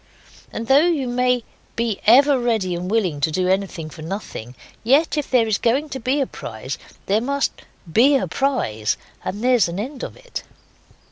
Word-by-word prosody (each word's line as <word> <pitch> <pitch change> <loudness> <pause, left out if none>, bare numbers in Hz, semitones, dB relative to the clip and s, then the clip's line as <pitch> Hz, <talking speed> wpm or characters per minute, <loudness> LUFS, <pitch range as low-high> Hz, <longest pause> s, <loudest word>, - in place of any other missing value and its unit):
And 230 - -4
though 280 +7 +5
you 300 -7 0
may 250 0 +1 0.3
be 230 -3 -1
ever 275 +4 +6
ready 220 -7 0
and 175 +1 -4
willing 185 -10 0
to 155 - +2
do 180 +4 0
anything 190 -4 -1
for 160 - -11
nothing, 155 - -6 0.3
yet 280 +9 +3
if 295 -2 -2
there's 225 -5 +2
going 270 +6 +1
to 265 - -5
be 260 +4 0
a 275 - +2
prize 125 - -7 0.3
there 205 +3 +2
must 280 +3 -1 0.3
BE 270 +6 +6
a 270 - +1
prize 115 - 0 0.3
and 205 +4 -4
there's 250 -6 +4
an 170 +3 -4
end 260 +5 -5
of - - -6
it. - - -7
230 Hz, 180 wpm, -21 LUFS, 185-270 Hz, 0.3 s, ever